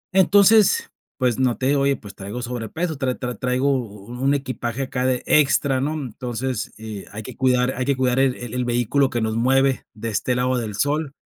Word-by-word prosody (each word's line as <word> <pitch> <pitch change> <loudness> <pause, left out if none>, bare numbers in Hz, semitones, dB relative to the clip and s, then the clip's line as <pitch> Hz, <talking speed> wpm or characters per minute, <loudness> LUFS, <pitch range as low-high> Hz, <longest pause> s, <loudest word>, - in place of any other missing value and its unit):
entonces, 205 - +5 0.3
pues, 125 -3 +1
no 125 -2 +2
te 130 - -3
digo, 140 0 +2
oye, 140 0 +2
pues, 100 -6 -11
traigo 105 +6 -6
sobrepeso, 125 +7 -3
tra 130 -2 0
tra 125 -1 -4
traigo 130 +4 +1
u 105 -3 -6
u 125 +1 -7
un 140 +2 +3
equipaje 130 -2 -3
acá 130 -1 -2
de 125 -1 0
extra, 135 -2 +3
¿no?, 145 +3 -1
entonces, 125 -3 -4
eh, 110 -3 -7
hay 110 +2 -7
que 125 +2 -9
cuidar 125 0 +2
hay 130 - -2
que 140 +1 +1
cuidar 130 0 +1
el 135 -1 +3
el 125 +1 -4
vehículo 120 +3 +1
que 120 - -2
nos 110 0 -1
mueve 135 +3 +2
de 115 +1 -4
este 125 +3 0
lado 125 +1 +1
del 110 -3 -4
sol, 145 +3 -1
125 Hz, 205 wpm, -22 LUFS, 120-135 Hz, 0.3 s, entonces